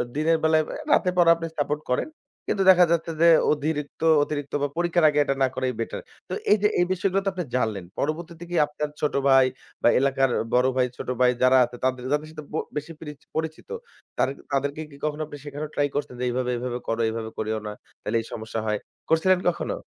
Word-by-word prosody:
দিনের 160 +2 +2
বেলায়; 160 0 +4 0.3
রাতের 180 -2 +3
পড়া 170 -1 +6
আপনি 165 0 -5
সাপোর্ট 145 +1 -1
করেন। 125 - 0 0.4
কিন্তু 195 - +1
দেখা 180 -1 +8
যাচ্ছে 165 0 0
যে, 170 - +7 0.3
অধিরিক্ত 150 0 -3 0.2
অতিরিক্ত 145 -2 -5
বা 145 - +2
পরীক্ষার 175 -1 +2
আগে 150 0 +1
এটা 140 - -1
না - - +4
করাই 130 -1 -1
বেটার। 115 - -4 0.3
তো - - -4 0.2
এই - - +7
যে, 210 - +5
এই 175 - +4
বিষয়গুলো 190 +1 0
তো - - +3
আপনি 185 -1 -3
জানলেন। 110 -6 -1 0.2
পরবর্তীতে 165 +3 -3
কি 175 - -3
আপনার 150 0 -4
ছোট 150 - 0 0.2
ভাই 135 -1 +6 0.4
বা - - +5
এলাকার 135 0 +2 0.2
বড় 125 +1 +4
ভাই, 125 -1 +3
ছোট - - -6
ভাই 125 -1 +6
যারা 130 +1 +6
আছে 120 - -11
তাদের 130 -1 0
যাদের 150 +1 -1
সাথে 155 -1 -9
ব - - -3 0.2
বেশি 150 +3 -5
পিরিচ 150 -2 -9 0.2
পরিচিত, 160 0 -4 0.5
তারে 135 - +2 0.2
তাদেরকে 140 +2 -1
কি - - -13
কখনো 155 0 -2
আপনি 145 - -9
শেখানো 145 +1 -5
ট্রাই 145 - +2
করছেন 145 -3 -3
যে, - - -2
"এইভাবে, 125 0 -1
এভাবে 125 0 -3
করো। 115 0 -1
এভাবে 110 0 -4
করিও 110 0 -2
না, - - -4 0.3
তাইলে 110 +2 0
এই - - -11
সমস্যা 110 0 -4
হয়।" 105 -1 0 0.3
করছিলেন 180 +3 +4
কখনো? 175 - -3
145 Hz, 210 wpm, -25 LUFS, 130-160 Hz, 0.5 s, দেখা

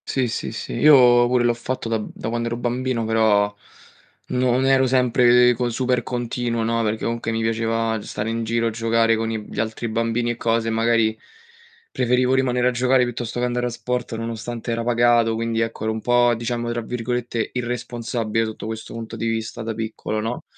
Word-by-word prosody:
Sì, 130 -2 0
sì, 110 - -4
sì, - - -6
io 125 -5 +6
pure 125 0 +2
l'ho 120 0 +3
fatto 120 +1 -4
da 115 -1 0
b 105 - -6
da - - -6
quand'ero 115 0 -2
bambino, 120 0 -1
però 105 -2 +2 0.7
non 125 +1 +1
ero 135 -1 +4
sempre 125 -1 +4
co 120 +1 -1
super 125 +1 0
continuo, 120 -1 -2
no, 115 +1 0
perché 110 0 -2
comunque 115 -1 -2
mi 115 0 -1
piaceva 115 0 0
stare 105 +2 -4
in 115 0 -2
giro 115 +1 0
a - - +1
giocare 115 0 +2
con 110 0 -2
i 110 -1 -3
gli - - -7
altri 110 +1 -2
bambini 115 +1 0
e 120 - -5
cose, 115 -1 0
e - - -1
magari 115 -1 +2 0.7
preferivo 125 +1 +2
rimanere 125 -2 +2
a - - 0
giocare 125 +1 +3
piuttosto 120 -1 -4
che 125 - +1
andare 125 0 -1
a - - -2
sport, 125 0 -3
nonostante 115 +1 -5
era 115 0 -1
pagato, 120 -1 +3
quindi, 115 0 -1
ecco, 115 -1 -3
ero 110 0 0
un 110 - -5
po', 120 0 +3
diciamo, 120 +1 -3
tra 120 0 -2
virgolette, 120 0 -3
"irresponsabile", 120 -2 -2
sotto 110 -1 -7
questo 110 0 -6
punto 115 0 -6
di 115 0 -3
vista, 115 +1 -3
da 110 0 -3
piccolo, 110 0 -4
no, 115 +3 -4
115 Hz, 195 wpm, -22 LUFS, 115-125 Hz, 0.7 s, io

